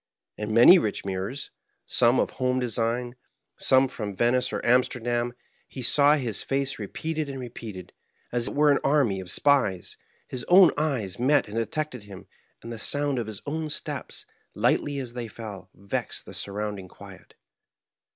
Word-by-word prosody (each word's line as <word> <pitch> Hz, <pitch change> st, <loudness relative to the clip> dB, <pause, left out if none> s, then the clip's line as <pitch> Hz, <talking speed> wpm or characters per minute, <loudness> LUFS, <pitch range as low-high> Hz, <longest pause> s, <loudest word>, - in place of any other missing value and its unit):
In 105 Hz, +1 st, -4 dB
many 120 Hz, -, +8 dB
rich 105 Hz, -9 st, -3 dB
mirrors, 95 Hz, +8 st, -4 dB, 0.3 s
some 120 Hz, +1 st, +3 dB
of -, -, 0 dB
home 130 Hz, 0 st, 0 dB
design, 120 Hz, +1 st, -1 dB, 0.4 s
some 130 Hz, 0 st, +4 dB
from 105 Hz, -5 st, -6 dB
Venice 125 Hz, +3 st, +1 dB
or -, -, -2 dB
Amsterdam, 120 Hz, -1 st, +1 dB, 0.3 s
he 130 Hz, -, -7 dB
saw 145 Hz, +4 st, +5 dB
his 120 Hz, -8 st, -3 dB
face 135 Hz, -1 st, -2 dB
re 105 Hz, -, -5 dB
peated 155 Hz, +2 st, -4 dB
and 135 Hz, -1 st, -6 dB
repeated, 110 Hz, -7 st, -8 dB, 0.4 s
as 120 Hz, 0 st, +1 dB
it -, -, -5 dB
were 150 Hz, 0 st, +5 dB
an 140 Hz, -, +3 dB
army 135 Hz, -9 st, +2 dB
of 95 Hz, -1 st, -8 dB
spies; 115 Hz, -8 st, +2 dB, 0.3 s
his 125 Hz, -2 st, -3 dB
own 180 Hz, -1 st, +7 dB
eyes 135 Hz, -, -2 dB
met 145 Hz, +4 st, +3 dB
and 105 Hz, +2 st, -6 dB
detected 125 Hz, +1 st, -3 dB
him; 100 Hz, -3 st, -11 dB, 0.4 s
and 115 Hz, +1 st, -7 dB
the 115 Hz, -, -7 dB
sound 145 Hz, +1 st, +1 dB
of 115 Hz, -, -4 dB
his 105 Hz, -3 st, -6 dB
own 155 Hz, +1 st, -3 dB
steps, -, -, -4 dB, 0.3 s
lightly 145 Hz, -1 st, +1 dB
as 125 Hz, -3 st, -5 dB
they 120 Hz, -1 st, -5 dB
fell, 100 Hz, -4 st, -9 dB
vexed 100 Hz, 0 st, -4 dB
the -, -, -11 dB
surrounding 100 Hz, -1 st, -4 dB
quiet. -, -, -14 dB
120 Hz, 165 wpm, -26 LUFS, 105-140 Hz, 0.4 s, many